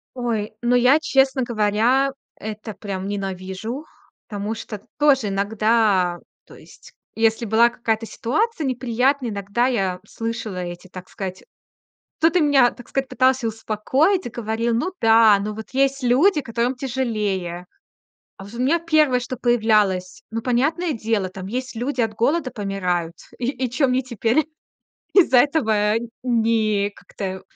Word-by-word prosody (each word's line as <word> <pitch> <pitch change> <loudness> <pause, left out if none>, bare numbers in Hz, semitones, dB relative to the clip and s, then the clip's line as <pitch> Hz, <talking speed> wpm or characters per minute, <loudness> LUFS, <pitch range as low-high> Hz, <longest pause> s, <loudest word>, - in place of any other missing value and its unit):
Ой, 225 -4 -2
ну, 240 +1 +2
я, 250 +5 +5
честно 270 -3 +2
говоря, 235 +4 +2 0.3
это 215 0 -7
прям 195 -2 -5
ненавижу, 195 - -5 0.4
потому 210 +1 -4
что 210 -2 -7 0.2
тоже 270 -8 +3
иногда, 200 -3 +1 0.3
то - - -16
есть, - - -16 0.2
если 225 +1 +1
была 225 +3 +4
какая-то 225 -1 -2
ситуация 315 - -1
неприятная, 255 +1 0
иногда 205 +4 -1
я 190 -7 -1
слышала 225 -3 -5
эти, 175 +1 -6
так 185 0 -10
сказать, 190 -1 -6 0.8
кто-то 330 +3 +3
меня, 280 -5 +4
так 245 - -14
сказать, 270 -1 -2
пытался 260 -2 +2
успокоить 225 - 0
и - - -3
говорил: 230 0 -2
"Ну 330 +11 0
да, 225 -2 +6
ну, 215 - -3
вот 220 +1 -9
есть 275 0 +1
люди, 295 +9 +3
которым 235 +1 -1
тяжелее". 210 -9 -2 0.7
А 195 - -9
вот 205 +4 -12
у - - -7
меня 315 +6 +3
1, 310 -6 +2
что 250 +1 -5
появлялось: 215 -6 +1
"Ну, 225 +1 -3
понятное 300 +8 0
дело, 220 -4 -1
там 185 0 -8
есть 255 +2 -4
люди, 255 +3 -2
от 225 -2 0
голода 280 +5 0
помирают. 180 -6 -2 0.2
И 245 0 -1
и 255 -3 -3
чё 265 +2 +2
мне 255 0 +1
теперь 240 +4 0 0.7
из-за 325 -10 +6
этого 220 -8 +2 0.3
не 220 -4 +1
как-то 190 -2 -7
230 Hz, 145 wpm, -22 LUFS, 205-260 Hz, 0.8 s, да